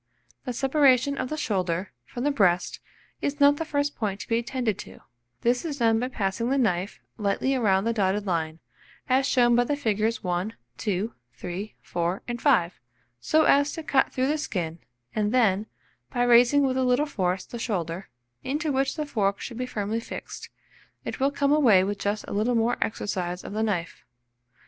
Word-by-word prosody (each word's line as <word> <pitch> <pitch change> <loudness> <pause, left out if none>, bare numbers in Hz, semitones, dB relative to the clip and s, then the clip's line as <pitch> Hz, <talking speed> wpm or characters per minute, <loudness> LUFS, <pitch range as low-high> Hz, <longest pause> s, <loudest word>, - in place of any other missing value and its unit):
The 250 - -3
separation 270 0 +3
of 255 - -2
the 310 - -3
shoulder 185 - -1
from 240 - -6
the 290 - +2
breast 180 -9 +2 0.4
is 285 - -1
the 285 0 +6
first 290 -1 -1
point 205 -3 -2
to - - -8
be 230 0 +2
attended 240 -4 -2
to; - - -10 0.4
this 245 +1 +1
is 305 -4 -4
done 225 -3 +3
by 250 - -1
passing 230 0 -2
the 275 - +2
knife 195 -6 0 0.2
lightly 210 +6 +1
round 200 -5 +2
the 230 - +1
dotted 200 -1 0
line, 160 -4 -1 0.5
as 265 0 +3
shown 240 -3 +4
by 245 - +4
the 290 +4 -1
figures 220 -4 0
1, 180 +4 -2 0.2
2, 210 +2 -1 0.2
3, 180 - -6
4, 175 +2 -2
and 240 -1 -4
5, 200 - +2 0.4
so 315 - +3
as 285 0 +4
to 325 - -6
cut 275 -3 +2
through 255 - 0
the 300 +3 0
skin, 170 - -3 0.3
and 210 -1 0
then, 220 -4 +2 0.4
by 245 -2 +1
raising 245 +4 +5
with 260 -1 +1
a 260 - +2
little 250 +3 +3
force 185 -9 -1
the 235 - -8
shoulder, 185 -5 -3 0.3
into 300 +3 -1
which 270 0 0
the 305 -2 -2
fork 200 -8 0
should 235 - -7
be 250 0 -3
firmly 215 -1 -2
fixed, 230 - -8 0.6
it - - -5
will 270 +1 +3
come 280 0 0
away 240 -11 +5
with 200 +1 -2
just 205 +1 -2
a - - -5
little 220 +4 +1
more 230 +1 +2
exercise 180 -4 -2
of - - -7
the 215 - -1
knife. 190 -7 -2
230 Hz, 185 wpm, -26 LUFS, 195-265 Hz, 0.6 s, the